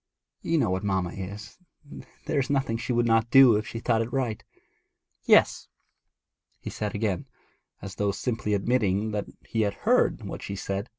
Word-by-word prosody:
You 165 - 0
know 135 - +1
what 95 +2 -2
mamma 95 -3 -1
is; 100 - -8 0.7
there - - 0
is 135 - -2
nothing 135 -5 0
she 120 - -4
would 120 0 +2
not 115 0 +2
do 130 -3 +7
if 105 +1 -2
she - - -6
thought 115 -1 +1
it 115 +2 -4
right.' 125 -5 -2 0.8
'Yes,' - - +4 0.9
he - - -7
said 105 -1 -4
again, 100 -5 -2 0.6
as 100 - -7
though 100 -1 0
simply 110 -1 -2
admitting 105 -1 0
that 105 -1 -3 0.2
he 115 - -1
had 100 -2 0
heard - - +2
what - - -6
she 100 - -5
said. 100 +3 -4
110 Hz, 175 wpm, -26 LUFS, 100-120 Hz, 0.9 s, do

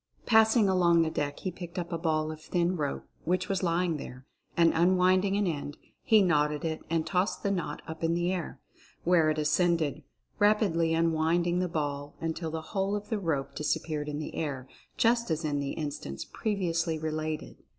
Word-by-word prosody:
Passing 220 -1 +5
along 175 -3 +4
the 160 - -1
deck 145 -1 -3
he 185 - -2
picked 175 -1 -9
up 175 0 -3
a - - 0
ball 155 -2 0
of 155 0 -9
thin 175 +2 0
rope 145 -4 -2 0.2
which 185 +2 0
was 195 -2 -1
lying 170 -2 +1
there, 125 -2 -9 0.3
and, 170 -1 +5
unwinding 185 +3 +3
an 205 - +1
end, 145 -4 -3 0.2
he 215 -2 +5
knotted 150 -3 +1
it 160 -1 -2
and 165 -1 0
tossed 185 +2 0
the 200 - +1
knot 185 -3 -3
up 160 +1 -7
in 165 +1 +2
the 175 +2 0
air, 180 -3 -4 0.4
where 170 -3 +4
it 155 - 0
ascended, 155 0 +1 0.4
rapidly 195 -6 +3
unwinding 165 +2 +2
the 180 - +1
ball, 145 -2 -3
until 165 0 -3
the 160 0 -4
whole 195 0 0
of 205 0 -5
the 220 -3 -1
rope 155 -7 -2
disappeared 150 0 -2
in 145 - -3
the 150 - -5
air, 135 -5 -3 0.3
just 235 -1 +2
as 160 0 -1
in 145 -1 0
the 140 -1 -2
in 150 -2 -2
stance 70 - -6
previously 170 -6 -1
related. 155 0 -4
165 Hz, 190 wpm, -29 LUFS, 155-185 Hz, 0.4 s, Passing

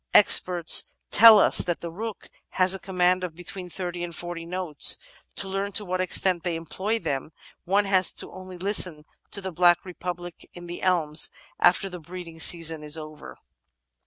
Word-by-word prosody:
Experts 175 -3 +5 0.2
teU 225 0 +9
us - - +4
that 175 -2 -1
the 170 - -6
Rook 220 +4 -7 0.3
has 185 +1 +5
command 185 -1 +1
of 175 -3 -5
be 180 - -11
tween 180 0 -7
thirty 175 -1 -5
and 170 -1 -6
forty 175 -1 -7
notes. 180 -4 +1 0.4
To 195 - 0
learn 195 +1 -3
to 210 - -2
what 185 0 -2
extent 185 -1 0
they 175 -2 -2
employ 190 +7 -3
them 150 -8 -4 0.4
one 200 +3 +2
has 190 -2 +2
only 185 -1 -11
to 180 - -6
listen 180 -6 +1 0.3
to 200 - -4
''the 190 -1 -5
black 175 +1 +3
republic 175 -1 -7
in 175 0 -10
the 175 0 -7
elms," 160 -5 +2 0.3
after 180 +2 +3
the 180 -2 -8
breeding 170 0 -10
season 165 -1 +1
is 150 +1 -2
over. 155 - -10
180 Hz, 175 wpm, -25 LUFS, 165-185 Hz, 0.4 s, teU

